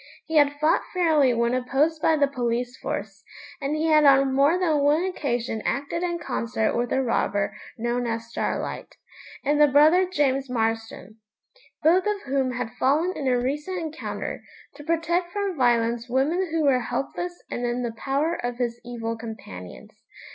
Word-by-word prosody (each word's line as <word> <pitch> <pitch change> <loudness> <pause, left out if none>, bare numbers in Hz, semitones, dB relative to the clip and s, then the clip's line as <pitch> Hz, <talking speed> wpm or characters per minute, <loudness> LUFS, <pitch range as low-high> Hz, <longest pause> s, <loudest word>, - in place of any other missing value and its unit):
He 320 -1 0
had 290 -1 +5
fought 310 +2 +3
fairly 315 -7 +4
when 235 0 +1
opposed 275 +5 +1
by 320 - +4
the 290 -2 +3
police 245 -2 -2
force, 200 -3 -5 0.4
and 280 +2 -1
he 310 +1 -1
had 310 -1 +5
on 275 -1 +5
more 280 +6 +4
than 325 -5 +1
one 295 +4 +3
occasion 245 - -2
acted 285 +5 -2
in 345 -1 -1
concert 230 -8 -1
with 240 0 0
the 265 - +1
robber 200 -4 0 0.2
known 240 +1 -1
as 230 0 -3
Starlight, 235 - -4 0.5
and 295 +1 +2
the 295 - +8
brother 310 +7 +5
James 275 -6 0
Marston, 225 -3 -3 0.6
both 360 +6 +4
of 415 -1 -1
whom 265 -2 0
had 245 -2 -4
fallen 310 +8 +2
in 275 - -3
a 250 -1 +3
recent 295 +9 -2
encounter, 320 -2 -5 0.3
to 295 - -12
protect 335 +2 0
from 400 -3 -2
violence 240 -2 +1
women 305 +9 +1
who 320 -1 0
were 270 -3 +4
helpless 275 +9 -4
and 240 - -3
in 240 +1 -2
the 235 -2 -3
power 280 +8 -1
of 245 0 -3
his 240 -1 -2
evil 230 -1 -4
companions. 220 - -9
270 Hz, 170 wpm, -25 LUFS, 240-315 Hz, 0.6 s, the